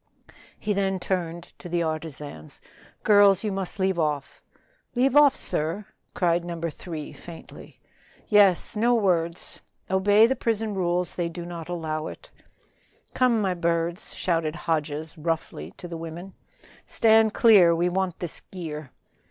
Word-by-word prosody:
He 210 Hz, -, -1 dB
then 195 Hz, -1 st, 0 dB
turned 175 Hz, -2 st, -3 dB, 0.2 s
to 175 Hz, -, -9 dB
the 170 Hz, 0 st, 0 dB
artisans. 155 Hz, -, -6 dB, 0.4 s
"Girls, 205 Hz, -2 st, +5 dB
you 210 Hz, -, -1 dB
must 190 Hz, -1 st, -3 dB
leave 190 Hz, -2 st, +1 dB
off." 150 Hz, -3 st, -2 dB, 0.5 s
"Leave 260 Hz, +2 st, +2 dB
off, 290 Hz, -2 st, +7 dB
sir?" 165 Hz, +7 st, -2 dB, 0.3 s
cried 170 Hz, -1 st, +1 dB
No. 170 Hz, -1 st, -5 dB
3 160 Hz, -1 st, -6 dB
faintly. 170 Hz, -2 st, -12 dB, 0.5 s
"Yes, 205 Hz, -3 st, +4 dB
no 235 Hz, +3 st, +3 dB
words; 175 Hz, -6 st, -1 dB, 0.3 s
obey 205 Hz, +3 st, +5 dB
the 260 Hz, +3 st, +1 dB
prison 225 Hz, -3 st, -1 dB
rules; 180 Hz, -2 st, 0 dB
they 175 Hz, -1 st, -2 dB
do 170 Hz, 0 st, -7 dB
not 170 Hz, -1 st, -7 dB
allow 160 Hz, -3 st, -3 dB
it." -, -, -11 dB, 0.8 s
"Come, 240 Hz, -4 st, +2 dB
my 190 Hz, -2 st, +1 dB
birds," 170 Hz, +1 st, -1 dB
shouted 165 Hz, -3 st, -1 dB
Hodges 155 Hz, -2 st, -2 dB
roughly 160 Hz, -, -3 dB
to 175 Hz, -, -8 dB
the 170 Hz, -1 st, -6 dB
women. 165 Hz, +3 st, -8 dB, 0.5 s
"Stand 220 Hz, -1 st, +4 dB
clear, 190 Hz, -7 st, +6 dB
we 170 Hz, +2 st, +1 dB
want 185 Hz, -1 st, -1 dB
this 175 Hz, -3 st, -4 dB
gear." 155 Hz, -6 st, -7 dB
175 Hz, 140 wpm, -25 LUFS, 165-200 Hz, 0.8 s, off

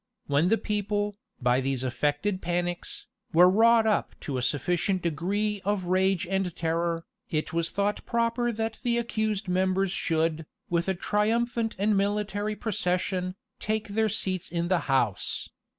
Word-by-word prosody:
When 145 Hz, +4 st, +2 dB
the 225 Hz, +4 st, +4 dB
people, 205 Hz, -1 st, -1 dB, 0.2 s
by 125 Hz, 0 st, +2 dB
these 135 Hz, -1 st, -1 dB
affected 145 Hz, -, 0 dB
panics, 175 Hz, 0 st, -3 dB, 0.3 s
were 175 Hz, +2 st, +8 dB
wrought 225 Hz, +4 st, +5 dB
up 215 Hz, -1 st, +1 dB
to 135 Hz, -3 st, -3 dB
a -, -, -2 dB
sufficient 175 Hz, +8 st, 0 dB
degree 195 Hz, +6 st, -1 dB
of 200 Hz, 0 st, 0 dB
rage 190 Hz, 0 st, +2 dB
and 190 Hz, -1 st, -1 dB
terror, 165 Hz, 0 st, -1 dB, 0.2 s
it 155 Hz, +2 st, -2 dB
was 170 Hz, 0 st, 0 dB
thought 200 Hz, +1 st, -1 dB
proper 235 Hz, +1 st, 0 dB
that 225 Hz, 0 st, -3 dB
the 240 Hz, -2 st, +1 dB
accused 220 Hz, -4 st, -1 dB
members 185 Hz, +1 st, +1 dB
should, 160 Hz, -3 st, 0 dB, 0.2 s
with 170 Hz, 0 st, +1 dB
a 190 Hz, -, +1 dB
triumphant 225 Hz, +4 st, 0 dB
and 205 Hz, +2 st, +2 dB
military 205 Hz, +1 st, 0 dB
procession, 185 Hz, -3 st, -1 dB, 0.2 s
take 215 Hz, 0 st, -2 dB
their 220 Hz, +2 st, +1 dB
seats 185 Hz, -3 st, -1 dB
in 170 Hz, 0 st, -1 dB
the 185 Hz, -2 st, +3 dB
house. 120 Hz, -7 st, +1 dB
190 Hz, 150 wpm, -27 LUFS, 170-210 Hz, 0.3 s, were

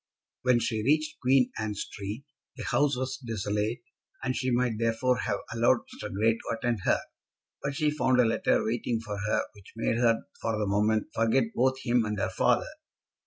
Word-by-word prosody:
When 125 Hz, -1 st, +4 dB
she 115 Hz, -2 st, -1 dB
reached 150 Hz, +6 st, +1 dB
Queen 130 Hz, 0 st, +3 dB
Anne 110 Hz, -1 st, -2 dB
Street, 100 Hz, +5 st, -5 dB, 0.3 s
the -, -, -5 dB
house 145 Hz, -3 st, +2 dB
was 130 Hz, +1 st, -2 dB
desolate, 110 Hz, -1 st, -2 dB, 0.4 s
and 130 Hz, -1 st, -1 dB
she 130 Hz, -, -1 dB
might 120 Hz, -3 st, +1 dB
therefore 115 Hz, +2 st, +1 dB
have -, -, -1 dB
allowed -, -, +3 dB
Mr. -, -, -7 dB
Grey 110 Hz, +4 st, +3 dB
to 115 Hz, 0 st, -4 dB
attend 120 Hz, -1 st, -1 dB
her. -, -, +3 dB, 0.6 s
But 140 Hz, 0 st, -3 dB
she 150 Hz, -1 st, +2 dB
found 130 Hz, -4 st, +2 dB
a 125 Hz, -, +6 dB
letter 115 Hz, -, +2 dB
waiting 115 Hz, +1 st, -1 dB
for 105 Hz, -3 st, -5 dB
her 105 Hz, +2 st, +1 dB
which 100 Hz, -2 st, -16 dB
made 115 Hz, 0 st, 0 dB
her 115 Hz, -2 st, +3 dB, 0.2 s
for 115 Hz, -1 st, -1 dB
the 105 Hz, -, 0 dB
moment 105 Hz, +2 st, +1 dB
forget 115 Hz, +1 st, +2 dB
both 130 Hz, +1 st, +1 dB
him 120 Hz, -2 st, +3 dB
and 105 Hz, 0 st, -2 dB
her 95 Hz, -, -1 dB
father. 120 Hz, +5 st, +2 dB
115 Hz, 185 wpm, -28 LUFS, 110-130 Hz, 0.6 s, a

